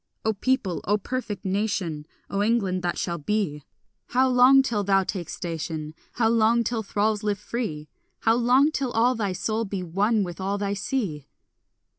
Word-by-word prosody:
O 220 - +2
people, 205 -4 0
O 205 +3 +2
perfect 210 -3 -5
nation, 190 -6 -1 0.2
O 200 - -1
England 205 -4 +1
that 175 -1 -2
shall 170 -1 -2
be, 155 -3 -1 0.5
How 260 +1 +3
long 255 +2 +6
till 220 -6 -1
thou 195 -1 +3
take 180 -3 -4
station? 160 -2 -4 0.2
How 225 -1 +2
long 230 +1 +3
till 230 0 -1
thralls 210 0 0
live 210 -2 0
free? 205 -9 -4 0.3
How 225 - +4
long 250 +5 +4
till 275 -4 -1
all 240 +3 +3
thy 205 -6 -2
soul 215 +4 -1
be 195 -3 -4
one 200 +5 +1
with 175 0 -6
all 195 +2 -1
thy 200 0 -1
sea? 200 - -3
205 Hz, 170 wpm, -25 LUFS, 185-230 Hz, 0.5 s, long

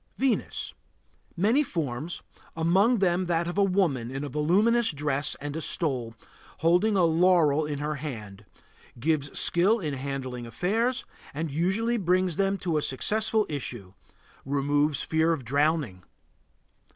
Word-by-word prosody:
VENUS. 265 -3 -1 0.6
Many 220 - +3
forms, 160 - -3 0.3
among 190 +9 +3
them 185 -2 +1
that 170 0 0
of 175 - -4
a 200 - +3
woman 175 -12 +1
with 135 +2 -5
a 145 - -4
voluminous 205 - +2
dress 145 -1 -1
and 145 +1 -5
a 160 - -3
stole, 130 -9 -1 0.5
holding 180 +6 +3
a 185 - +3
laurel 165 -3 +3
in 145 -1 -3
her 150 +1 -3
hand. 110 -9 -7 0.5
Gives 145 0 0
skill 195 +7 +3
in 155 -7 -3
handling 130 -3 -5
affairs 225 - 0 0.3
and 160 0 -3
usually 190 +10 0
brings 185 -3 +1
them 195 0 +1
to 170 -4 -1
a - - +1
successful 215 - +1
issue; 120 -10 -6 0.5
removes 145 +1 +1
the - - -2
fear 160 +1 +2
of 140 -7 -5
drowning. 140 - 0
160 Hz, 140 wpm, -27 LUFS, 140-185 Hz, 0.6 s, Many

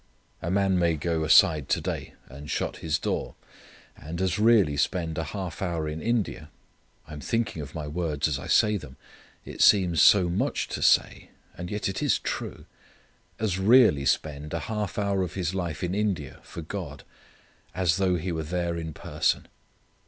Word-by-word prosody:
A 85 - -3
man 95 -1 +2
may 85 -2 +2
go 80 +1 -1
aside 75 -1 +5
to - - +2
day, - - -5
and 70 +3 -11
shut - - -2
his 80 -3 -1
door, - - -3 0.6
and 80 +5 -7
as 95 +2 0
really 105 -9 +4
spend 80 +1 -1
a 80 - -2
half 90 +1 -6
hour 85 -4 -2
in 75 +1 -5
India 110 -10 -2 0.6
I 75 - -11
am 75 - -7
thinking 115 -6 -2
of 75 +2 -9
my 75 -2 -4
words 80 -1 -1
as 70 -3 -2
I - - -8
say 105 -1 +3
them, 65 -8 -11 0.5
it - - -6
seems 90 -6 +5
so 95 -4 +6
much 85 +2 -1
to - - -4
say, - - +2 0.3
and 90 +1 -6
yet 105 +2 -2
it 95 - -3
is - - +2
true - - -5 0.7
as 100 -4 -1
really 105 - +5
spend 75 +1 -1
a 85 - -2
half 105 +4 -4
hour 100 -2 0
of 90 -1 -4
his 90 -2 -2
life 90 -2 -3
in 90 0 -1
India 95 -9 -2
for 85 - -9
God 80 -4 -7 0.7
as 90 -2 +2
though 95 -2 +2
he 90 +2 -3
were 80 -1 -2
there 85 +2 -2
in 80 -1 -5
person. - - -1
85 Hz, 180 wpm, -26 LUFS, 75-95 Hz, 0.7 s, so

